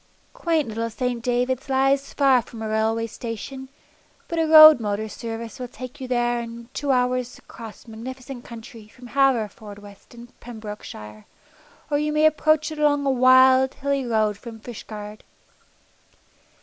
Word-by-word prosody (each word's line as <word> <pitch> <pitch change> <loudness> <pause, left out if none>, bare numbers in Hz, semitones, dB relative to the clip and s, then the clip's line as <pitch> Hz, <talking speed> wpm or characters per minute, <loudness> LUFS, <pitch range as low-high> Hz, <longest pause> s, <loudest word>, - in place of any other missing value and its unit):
Quaint 335 - 0
little 230 +1 -3
St. 245 +1 -3
Davids 250 +2 -1
lies 270 +1 +1
far 270 -3 +3
from 225 -1 -10
a - - -3
railway 220 +1 0
station, 245 +4 -7 0.6
but 335 -1 -3
a 325 - +1
road 310 -3 +10
motor 210 0 -2
service 225 +1 -7
will 250 - -5
take 255 +3 -10
you 260 - -5
there 240 -1 0
in 235 0 -8
a 245 - -30
two 290 - -3
hours' 250 -1 0
journey - - -18
across 225 0 -11
magnificent 250 +3 -8
country 225 -2 -11
from 245 +2 -14
Haverfordwest 215 -6 -2
in 240 0 -12
Pembrokeshire, 210 - -9 0.7
or 290 - +2
you 300 0 -1
may 305 +1 +2
approach 310 0 +2
it 310 - -7
along 290 -1 +2
a 275 - +2
wild, 260 +1 +5
hilly 280 -1 -1
road 215 -4 0
from 225 -1 -10
Fishguard. 215 -2 -9
245 Hz, 155 wpm, -23 LUFS, 225-270 Hz, 0.7 s, road